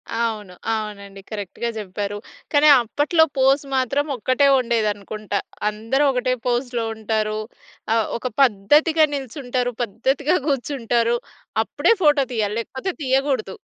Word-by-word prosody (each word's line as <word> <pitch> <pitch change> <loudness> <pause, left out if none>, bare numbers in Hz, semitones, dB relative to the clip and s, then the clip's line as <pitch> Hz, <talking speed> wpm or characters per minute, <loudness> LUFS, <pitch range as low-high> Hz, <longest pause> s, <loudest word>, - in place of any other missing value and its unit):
అవును. 215 -5 -2 0.2
అవునండి 200 -2 -6
కరెక్ట్‌గా 215 +2 -4
చెప్పారు. 205 0 -4 0.4
కానీ 295 +1 +5
అప్పట్లో 295 +8 +2
పోజ్ 270 +2 +4
మాత్రం 275 +3 +1
ఒక్కటే 260 +5 +2
ఉండేది 230 -3 +1
అనుకుంటా. 205 0 -4 0.3
అందరూ 225 +7 -1
ఒకటే 255 0 0
పోజ్‌‌లో 245 -1 -1
ఉంటారు 215 0 -1 0.6
ఆహ్, 225 - +2
ఒక 255 - -4
పద్ధతిగా 295 +8 +4
నిల్చుంటారు, 250 -2 -2
పద్ధతిగా 270 - 0
కూర్చుంటారు. 240 -4 0 0.5
అప్పుడే - - +2
ఫోటో 290 -2 +5
తీయాలి. 210 -2 -1
లేకపోతే 265 +10 -4
తీయకూడదు. 265 -6 0
240 Hz, 115 wpm, -22 LUFS, 215-275 Hz, 0.6 s, కానీ